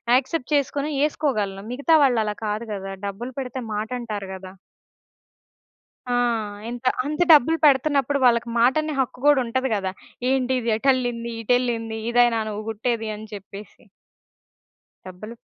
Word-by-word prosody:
Accept 275 Hz, +2 st, -1 dB
చేసుకొని 285 Hz, +1 st, 0 dB, 0.2 s
ఏసుకోగలను. 215 Hz, -11 st, -1 dB
మిగతా 285 Hz, +6 st, +1 dB
వాళ్ళు 245 Hz, -5 st, +3 dB
అలా 210 Hz, -1 st, -2 dB
కాదు 210 Hz, +2 st, -2 dB
కదా! 195 Hz, -1 st, -5 dB
డబ్బులు 235 Hz, +6 st, -6 dB
పెడితే 260 Hz, 0 st, -5 dB
మాటంటారు 215 Hz, -2 st, -4 dB
గదా! 190 Hz, 0 st, -10 dB, 1.6 s
ఆ! -, -, +1 dB, 0.6 s
ఎంత? 245 Hz, +1 st, -7 dB, 0.2 s
అంత 300 Hz, +3 st, -3 dB
డబ్బులు 315 Hz, +3 st, +6 dB
పెడతన్నప్పుడు 280 Hz, -1 st, +3 dB
వాళ్ళకి 235 Hz, -1 st, +3 dB
మాటనే 305 Hz, +6 st, +2 dB
హక్కు 250 Hz, -1 st, -3 dB
గూడా 290 Hz, -3 st, +6 dB
ఉంటది 260 Hz, +3 st, -1 dB
గద! 195 Hz, -2 st, -2 dB, 0.4 s
ఏంటి 260 Hz, -1 st, +1 dB
ఇది 230 Hz, -1 st, -1 dB
ఎటెళ్ళింది, 245 Hz, -2 st, 0 dB
ఇటెళ్ళింది 230 Hz, -2 st, 0 dB
ఇదేనా 240 Hz, -1 st, +4 dB
నువ్వు 210 Hz, +1 st, -5 dB
గుట్టేది 225 Hz, 0 st, -2 dB
అని 215 Hz, +1 st, -9 dB
చెప్పేసి. 200 Hz, +1 st, -11 dB, 1.2 s
డబ్బులు. 215 Hz, +5 st, -9 dB
240 Hz, 130 wpm, -23 LUFS, 215-265 Hz, 1.6 s, డబ్బులు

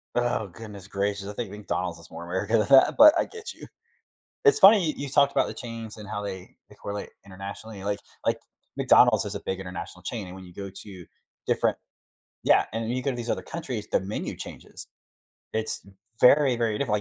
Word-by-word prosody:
Oh 120 Hz, -3 st, 0 dB
goodness 100 Hz, 0 st, -11 dB
gracious, 100 Hz, 0 st, -2 dB
I 105 Hz, -, -5 dB
think 115 Hz, -1 st, -4 dB
McDonald's 95 Hz, -4 st, -3 dB
is 85 Hz, -, -16 dB
more 85 Hz, -, -8 dB
America 95 Hz, +6 st, 0 dB
than 105 Hz, -, +1 dB
that, 135 Hz, -1 st, +7 dB
but 300 Hz, +1 st, +10 dB
I -, -, +2 dB
get 445 Hz, -1 st, -9 dB
you. -, -, -12 dB, 0.8 s
It's 430 Hz, -, +6 dB
funny 195 Hz, -3 st, +8 dB
you 155 Hz, -, 0 dB
you 145 Hz, -, -4 dB
talked 140 Hz, 0 st, +4 dB
about -, -, +2 dB
the -, -, -5 dB
chains 115 Hz, -2 st, -8 dB
and 105 Hz, -1 st, -10 dB
how 105 Hz, -1 st, -4 dB
they 95 Hz, -2 st, -7 dB
they -, -, -16 dB
correlate 100 Hz, 0 st, -6 dB, 0.2 s
internationally, 100 Hz, +2 st, -8 dB
like 100 Hz, 0 st, -1 dB, 0.3 s
like, -, -, +1 dB, 0.4 s
McDonald's -, -, +5 dB
is -, -, -5 dB
a -, -, -5 dB
big 95 Hz, 0 st, -2 dB
international 90 Hz, -2 st, -7 dB
chain 110 Hz, -5 st, -4 dB
and 90 Hz, -, -9 dB
when 95 Hz, -1 st, -10 dB
you 90 Hz, -, -14 dB
go 100 Hz, -1 st, -6 dB
to 95 Hz, -2 st, -11 dB, 0.4 s
different -, -, +1 dB, 0.7 s
Yeah, -, -, +5 dB
and 115 Hz, -, -2 dB
then 115 Hz, -, -2 dB
you 130 Hz, +1 st, -2 dB
go 140 Hz, -, +1 dB
to 125 Hz, -, -6 dB
these 120 Hz, 0 st, -5 dB
other -, -, 0 dB
countries, 130 Hz, -10 st, -5 dB
the -, -, +3 dB
menu 95 Hz, +3 st, -4 dB
changes. -, -, -10 dB, 0.7 s
It's 110 Hz, -2 st, -3 dB, 0.3 s
very, 135 Hz, -1 st, +6 dB
very 115 Hz, -3 st, 0 dB
different, 125 Hz, -7 st, 0 dB
105 Hz, 210 wpm, -26 LUFS, 95-120 Hz, 0.8 s, but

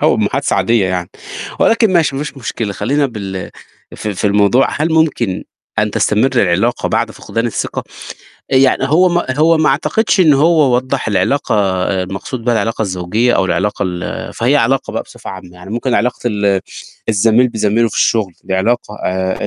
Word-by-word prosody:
هو -, -, +3 dB
محادثة -, -, 0 dB
عادية 115 Hz, -4 st, +2 dB
يعني. 90 Hz, -2 st, -3 dB, 0.5 s
ولكن 225 Hz, -3 st, +3 dB
ماشي 155 Hz, -6 st, +2 dB
ما 140 Hz, -, -2 dB
فيش 145 Hz, -, -8 dB
مشكلة 115 Hz, -4 st, -4 dB
خلينا 135 Hz, +9 st, 0 dB
بال 100 Hz, -6 st, -6 dB, 0.4 s
في 105 Hz, -2 st, -4 dB
في 95 Hz, -, -1 dB
الموضوع. 105 Hz, +6 st, +3 dB
هل 155 Hz, +3 st, -1 dB
ممكن 145 Hz, -, +1 dB, 0.3 s
أن -, -, +1 dB
تستمر 110 Hz, +5 st, +2 dB
العلاقة 100 Hz, +3 st, +1 dB
بعد -, -, 0 dB
فقدان 115 Hz, +1 st, -3 dB
الثقة؟ 115 Hz, -, -3 dB, 0.6 s
يعني 130 Hz, 0 st, +3 dB
هو 180 Hz, +5 st, +4 dB
ما 175 Hz, 0 st, 0 dB
هو 165 Hz, +2 st, +4 dB
ما 155 Hz, -, +3 dB
اعتقدش 220 Hz, -3 st, +1 dB
إن 155 Hz, -5 st, +6 dB
هو 150 Hz, -3 st, +3 dB
وضّح 130 Hz, 0 st, -1 dB
العلاقة 125 Hz, +7 st, 0 dB, 0.3 s
آآ 95 Hz, -1 st, -1 dB
المقصود 105 Hz, +6 st, -6 dB
بها 120 Hz, -1 st, +2 dB
العلاقة 110 Hz, +1 st, -1 dB
الزوجية 100 Hz, +5 st, 0 dB
او 95 Hz, -, +2 dB
العلاقة 95 Hz, +4 st, -1 dB
ال 90 Hz, -1 st, -5 dB
فهي -, -, +2 dB
علاقة -, -, +1 dB
بقى -, -, -2 dB
بصفة -, -, -11 dB
عامة. 95 Hz, -2 st, -10 dB
يعني 90 Hz, +2 st, -12 dB
ممكن 120 Hz, +3 st, -1 dB
علاقة 125 Hz, +1 st, 0 dB
ال 100 Hz, -3 st, +1 dB, 0.5 s
الزميل 115 Hz, +3 st, +3 dB
بزميله 110 Hz, 0 st, +1 dB
في -, -, -9 dB
الشغل، 105 Hz, -5 st, +1 dB
دي 95 Hz, -, -2 dB
علاقة 105 Hz, +2 st, -1 dB
آآ 95 Hz, 0 st, -1 dB
115 Hz, 175 wpm, -15 LUFS, 95-135 Hz, 0.6 s, إن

